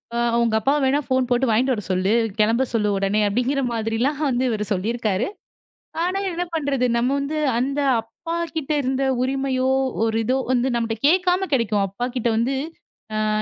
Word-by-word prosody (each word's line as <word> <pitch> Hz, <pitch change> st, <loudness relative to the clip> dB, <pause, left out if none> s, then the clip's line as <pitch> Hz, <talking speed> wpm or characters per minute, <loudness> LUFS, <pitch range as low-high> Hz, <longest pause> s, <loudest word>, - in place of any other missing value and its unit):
அ -, -, 0 dB, 0.2 s
உங்க 230 Hz, -2 st, +1 dB
அப்பாவ 275 Hz, +7 st, +2 dB
வேணா 270 Hz, +2 st, +3 dB
ஃபோன் 260 Hz, -1 st, +1 dB
போட்டு 245 Hz, +1 st, +2 dB
வாங்கிட்டு 250 Hz, +4 st, +2 dB
வரச் 210 Hz, -4 st, -5 dB
சொல்லு. 185 Hz, +2 st, +1 dB, 0.3 s
கிளம்ப 225 Hz, +4 st, +3 dB
சொல்லு 210 Hz, -2 st, +1 dB
உடனே, 195 Hz, +2 st, +1 dB
அப்பிடிங்கிற 250 Hz, +6 st, 0 dB
மாதிரி 225 Hz, -1 st, -2 dB
எல்லாம் 280 Hz, +3 st, 0 dB
வந்து 250 Hz, 0 st, 0 dB
இவரு 210 Hz, -2 st, -2 dB
சொல்லி 195 Hz, +2 st, 0 dB
இருக்காரு. 215 Hz, -5 st, -1 dB, 0.8 s
ஆனா 365 Hz, +2 st, 0 dB
என்ன 355 Hz, 0 st, -2 dB
பண்றது? 280 Hz, -5 st, 0 dB
நம்ம 240 Hz, +2 st, +1 dB
வந்து 285 Hz, +3 st, -3 dB, 0.2 s
அந்த 275 Hz, +4 st, -1 dB, 0.2 s
அப்பாகிட்ட 325 Hz, +5 st, -5 dB
இருந்த 265 Hz, +1 st, -1 dB, 0.2 s
உரிமையோ! 260 Hz, 0 st, 0 dB, 0.4 s
ஒரு 225 Hz, 0 st, +1 dB
இதோ 255 Hz, +4 st, +1 dB
வந்து 250 Hz, 0 st, +2 dB
நம்மகிட்ட 230 Hz, +1 st, -2 dB
கேக்காம 365 Hz, +3 st, +2 dB
கிடைக்கும். 215 Hz, -5 st, +2 dB
அப்பா 200 Hz, +6 st, -4 dB
கிட்ட 245 Hz, -2 st, 0 dB
வந்து, 255 Hz, +4 st, +1 dB, 0.7 s
ஆ -, -, 0 dB
250 Hz, 170 wpm, -22 LUFS, 225-275 Hz, 0.8 s, வேணா